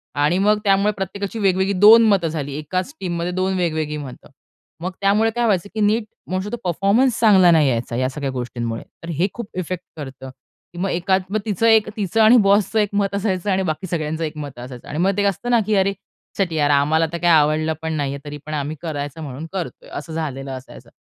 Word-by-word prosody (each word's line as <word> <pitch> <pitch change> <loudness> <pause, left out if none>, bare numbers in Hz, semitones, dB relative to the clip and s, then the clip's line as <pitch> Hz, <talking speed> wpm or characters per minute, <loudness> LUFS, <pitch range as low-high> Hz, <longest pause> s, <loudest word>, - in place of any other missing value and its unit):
आणि 145 +4 +2
मग 210 +2 +3
त्यामुळे 200 0 +3
प्रत्येकाची 200 +3 -5
वेगवेगळी 190 -1 +2
2 220 +3 +8
मतं 195 -5 +3
झाली. 150 -3 -4
एकाच 185 - -3
टीममध्ये 175 -1 -2
2 185 +1 -1
वेगवेगळी 155 -4 -1
मतं. 135 -4 -9 0.5
मग 180 +2 -3
त्यामुळे 205 +3 +3
काय 240 0 +1
व्हायचं 200 -3 +1
की - - -2
नीट 215 +2 +2 0.3
मोस्ट 185 +2 -2
ऑफ - - -6
द - - +1
परफॉर्मन्स 200 +8 +2
चांगला 190 -6 +6
नाही 155 -4 +4
यायचा 115 -1 -2
या 130 +1 0
सगळ्या 140 0 -4
गोष्टींमुळे. 120 -2 -4 0.2
तर 165 - -7
हे 180 +4 +2
खूप 235 -3 -7
इफेक्ट 180 0 -4
करतं. 135 -2 -8 0.4
की - - -12
मग 195 +2 -1
एकात 190 +3 0
तिचं 215 +1 0
एक 220 -2 +5
तिचं 210 +1 0
आणि 220 +3 +7
बॉसचं 205 +2 +3
एक 210 -1 +1
मत 200 -1 0
असायचं 200 -1 -1
आणि 190 0 +1
बाकी 170 +2 -3
सगळ्यांचं 160 -1 -2
एक 155 -1 -4
मत 145 -4 -7
असायचं. 125 0 -9
आणि 150 - -5
मग 185 +4 +2
ते - - +2
एक 200 - +2
असतं 220 +5 -5
ना 240 - +5
की 215 +1 +1
"अरे 195 0 +2 0.4
शीट 190 -4 0
यार 150 -2 +1
आम्हाला 150 +3 +3
तर - - -1
काय 175 0 +1
आवडलं 155 0 +3
पण 160 0 -3
नाहीये 140 -2 -2
तरी 145 0 -6
पण 155 - -6
आम्ही 150 +1 -3
करायचं 145 -2 -5
म्हणून 140 +2 -6
करतोय." 185 -4 -6
असं 160 +3 -6
झालेलं 140 -4 -4
असायचं. 130 0 -10
175 Hz, 215 wpm, -21 LUFS, 150-200 Hz, 0.5 s, 2